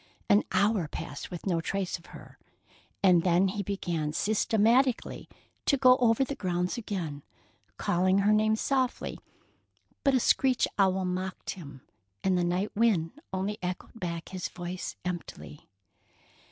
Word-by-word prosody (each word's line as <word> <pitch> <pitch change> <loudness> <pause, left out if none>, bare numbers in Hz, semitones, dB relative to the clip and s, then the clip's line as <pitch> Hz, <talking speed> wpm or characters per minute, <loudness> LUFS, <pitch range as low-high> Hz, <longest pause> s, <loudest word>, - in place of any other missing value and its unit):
An 205 +1 +5
hour 195 -2 +2
passed 145 0 -6
with 175 -2 -7
no 175 -4 +1
trace 190 +1 -2
of 170 - -19
her, - - -13 0.6
and 180 -3 +6
then 180 +2 +3
he 205 +2 -3
began 175 -6 -2
systematically 225 +6 +2 0.4
to 280 - +4
go 255 -1 +7
over 240 0 +3
the 270 - -3
grounds 180 -6 -1
again, 180 - -4 0.6
calling 185 +2 +2
her 210 - +5
name 215 0 +3
softly; 260 +2 -1 0.8
but 275 -2 +4
a - - +4
screech 255 +1 +3
owl 190 -1 +3
mocked 185 +1 -3
him, 140 -7 -10 0.4
and 190 -1 +2
the 180 - +2
night 180 +4 -1
wind 200 -7 +2 0.2
only 195 +2 -2
echoed 180 +5 -5
back 170 -3 -4
his 185 -2 -4
voice 175 0 -6
emptily. 175 -4 -6
190 Hz, 140 wpm, -29 LUFS, 175-220 Hz, 0.8 s, go